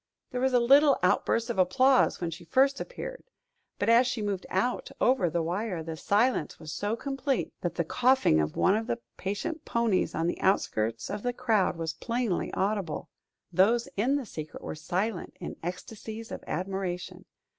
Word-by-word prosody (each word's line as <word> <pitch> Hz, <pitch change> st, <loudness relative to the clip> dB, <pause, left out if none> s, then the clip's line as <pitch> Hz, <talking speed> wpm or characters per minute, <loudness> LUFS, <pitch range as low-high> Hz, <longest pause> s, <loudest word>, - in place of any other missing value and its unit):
There 250 Hz, -, -2 dB
was 265 Hz, 0 st, +2 dB
a 245 Hz, -, +6 dB
little 275 Hz, +4 st, +6 dB
outburst 230 Hz, +1 st, +2 dB
of 220 Hz, -, -3 dB
applause 255 Hz, +9 st, +4 dB
when 170 Hz, -2 st, -2 dB
she 170 Hz, +2 st, -8 dB
first 270 Hz, -, +2 dB
appeared. -, -, -7 dB, 0.5 s
But 205 Hz, -, -1 dB
as 235 Hz, +2 st, +6 dB
she 240 Hz, -3 st, -2 dB
moved 200 Hz, -3 st, -3 dB
out 240 Hz, +7 st, 0 dB
over 245 Hz, -9 st, +3 dB
the 170 Hz, +1 st, 0 dB
wire, 180 Hz, 0 st, -2 dB
the 160 Hz, 0 st, -5 dB
silence 210 Hz, +2 st, +1 dB
was 155 Hz, -2 st, -7 dB
so 205 Hz, +5 st, -1 dB
complete 270 Hz, +1 st, -2 dB
that 175 Hz, -1 st, -2 dB
the 170 Hz, -, +1 dB
coughing 250 Hz, -, +3 dB
of 75 Hz, 0 st, -1 dB
one 190 Hz, -, +4 dB
of 220 Hz, +1 st, -2 dB
the 235 Hz, -, -1 dB, 0.2 s
patient 310 Hz, -, -3 dB
ponies 230 Hz, -5 st, +1 dB
on 165 Hz, -, 0 dB
the 175 Hz, -, -2 dB
outskirts 115 Hz, -, 0 dB
of 205 Hz, 0 st, -3 dB
the 245 Hz, +1 st, -1 dB
crowd 220 Hz, -8 st, +1 dB
was 165 Hz, -1 st, -2 dB
plainly 235 Hz, -5 st, -2 dB
audible. 195 Hz, -5 st, -1 dB, 0.4 s
Those 230 Hz, +8 st, +4 dB
in 245 Hz, +8 st, +2 dB
the 280 Hz, -3 st, -2 dB
secret 155 Hz, -7 st, -8 dB
were -, -, -4 dB
silent, 185 Hz, +5 st, -3 dB
in -, -, -6 dB
ecstasies 215 Hz, +5 st, -7 dB
of -, -, -6 dB
admiration. 185 Hz, +1 st, -4 dB
210 Hz, 175 wpm, -28 LUFS, 175-245 Hz, 0.5 s, a